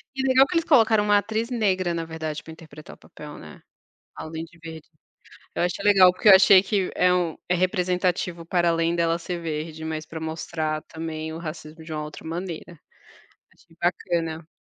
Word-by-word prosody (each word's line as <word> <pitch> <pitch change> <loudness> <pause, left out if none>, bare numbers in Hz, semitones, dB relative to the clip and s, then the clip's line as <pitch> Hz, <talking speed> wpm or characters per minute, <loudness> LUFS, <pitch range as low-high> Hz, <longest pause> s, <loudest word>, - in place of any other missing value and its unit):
E 265 - -2
legal 265 +1 +5
que - - -6
eles 330 - +2
colocaram 225 -7 +4
uma 205 0 +4
atriz 220 +4 -2
negra 190 -7 0
na 165 -1 -3
verdade 160 -2 -5
pra 160 - -11
interpretar 155 -2 -13
o - - -25
papel 150 -1 -12
né, 75 -1 -12 0.6
além 160 +1 -6
de 170 +1 -20
verde. 160 -2 -10 0.7
É - - -4
eu - - +2
achei 180 +2 -4
legal 190 -3 +7
porque 185 +4 -2
eu 190 - +11
achei 190 0 +7
que 195 -1 -1
é 180 0 +3
um 175 -3 -1
é 180 - +3
representativo 180 -1 -1
para 175 0 +1
além 165 0 +1
dela 170 0 +1
ser 175 +1 -5
verde 160 0 -5
mas 155 -1 -4
pra 160 +1 -8
mostrar 160 -1 -3
também 160 -1 -6
o - - -6
racismo 160 -1 -8
de 160 0 -7
uma 150 0 -3
outra 150 +1 -9
maneira. 170 -1 -6 0.7
Achei 165 - -25
bacana. 165 -2 -1
170 Hz, 195 wpm, -24 LUFS, 160-185 Hz, 0.7 s, eu